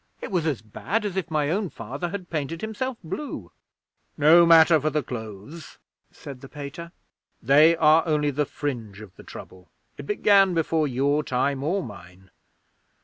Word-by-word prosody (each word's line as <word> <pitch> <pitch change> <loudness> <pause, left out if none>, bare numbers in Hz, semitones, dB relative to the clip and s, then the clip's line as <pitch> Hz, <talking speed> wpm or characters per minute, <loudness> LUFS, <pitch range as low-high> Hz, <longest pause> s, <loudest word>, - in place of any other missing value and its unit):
It - - -7
was 170 -4 0
as 140 -8 -2
bad 200 - -3
as 200 -3 -4
if 190 -3 -3
my 150 -2 0
own 195 +1 -1
Father 135 +9 -6
had 180 -1 -7
painted 160 +1 -3
himself 225 +3 -4
blue! 165 - -6 0.7
'"No 165 +3 +6
matter 165 -1 +6
for 155 - 0
the 150 0 -1
clothes," 110 +7 -9 0.3
said 135 -3 -11
the 135 - -11
Pater. 150 +4 -8 0.5
"They 150 +6 +5
are 155 0 +5
only 150 -2 +1
the 145 +1 -1
fringe 115 -8 -5
of 105 -4 -13
the - - -14
trouble. 95 0 -12 0.3
It 140 - -8
began 195 -3 +3
before 160 -1 +1
your 140 +3 0
time 135 +1 -1
or 180 +6 -1
mine. 95 - -13
150 Hz, 165 wpm, -24 LUFS, 130-170 Hz, 0.7 s, No